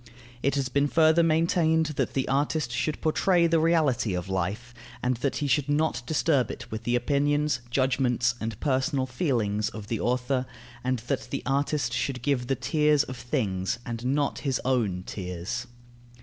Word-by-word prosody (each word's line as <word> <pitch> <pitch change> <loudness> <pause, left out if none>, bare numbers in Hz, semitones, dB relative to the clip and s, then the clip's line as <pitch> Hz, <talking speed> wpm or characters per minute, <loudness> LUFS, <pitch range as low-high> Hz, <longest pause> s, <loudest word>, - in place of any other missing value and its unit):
It 140 +1 +1
has 135 -2 0
been 140 +2 +1
further 160 +2 +4
maintained 160 0 +3
that - - -1
the 135 - 0
artist 145 0 0
should 125 +6 -2
portray 170 +2 +3
the 165 -1 +3
reality 150 - +2
of 90 +2 -4
life, 100 +7 -2 0.3
and 125 -1 +1
that 135 +3 -1
he 145 - -1
should 140 +1 +1
not 145 -3 +1
disturb 145 -5 +2
it - - -8
with 110 +1 -5
the 120 - +1
opinions, 145 +3 +1
judgments, 125 -2 +1
and 110 -2 -4
personal 135 -1 +1
feelings 115 - 0
of 105 -2 -9
the 115 - -1
author, 125 +1 0 0.4
and 130 0 0
that 120 - -2
the - - -3
artist 140 -2 0
should 125 -1 -2
give 130 -3 0
the 135 - +1
tears 150 +3 +2
of 130 - -7
things 115 -7 -1
and 115 -1 -5
not 140 +3 0
his 135 -3 -1
own 110 -9 0
tears. 90 +6 -5
130 Hz, 170 wpm, -27 LUFS, 120-145 Hz, 0.4 s, further